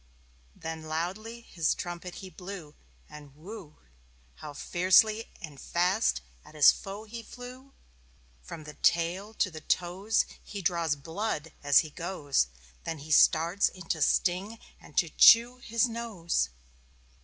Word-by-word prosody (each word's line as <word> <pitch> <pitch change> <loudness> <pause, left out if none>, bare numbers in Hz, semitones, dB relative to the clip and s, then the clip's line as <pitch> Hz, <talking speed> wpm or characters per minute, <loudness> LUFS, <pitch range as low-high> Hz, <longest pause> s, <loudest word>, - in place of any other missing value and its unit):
Then 160 0 -6
loudly 190 +9 -4
his 170 -8 -1
trumpet 175 0 -6
he 185 - -11
blew. 180 -3 -9 0.3
And 145 -2 -13
whew! 170 -1 -11 0.6
How 150 - -8
fiercely 190 +8 +3
and 150 -4 -9
fast 180 - +1 0.2
at 155 - -16
his 150 - +8
foe 200 +2 -8
he 230 +2 -8
flew. 255 +3 -11 0.7
From 155 - -9
the 150 0 -10
tail 180 +8 0
to 185 - 0
the 155 -1 -9
toes 185 +7 0 0.2
He 200 -2 -7
draws 170 -5 +1
blood 165 +1 -4
as 145 -1 +5
he 155 - -9
goes. 145 - -1 0.4
Then 165 - -4
he 155 +2 -10
starts 170 +5 +4
in 185 - -12
to 160 - -1
sting 190 +8 +1 0.2
and - - -17
to - - +4
chew 240 +2 +7
His 230 -1 0
nose. 210 - -2
175 Hz, 140 wpm, -29 LUFS, 155-215 Hz, 0.7 s, his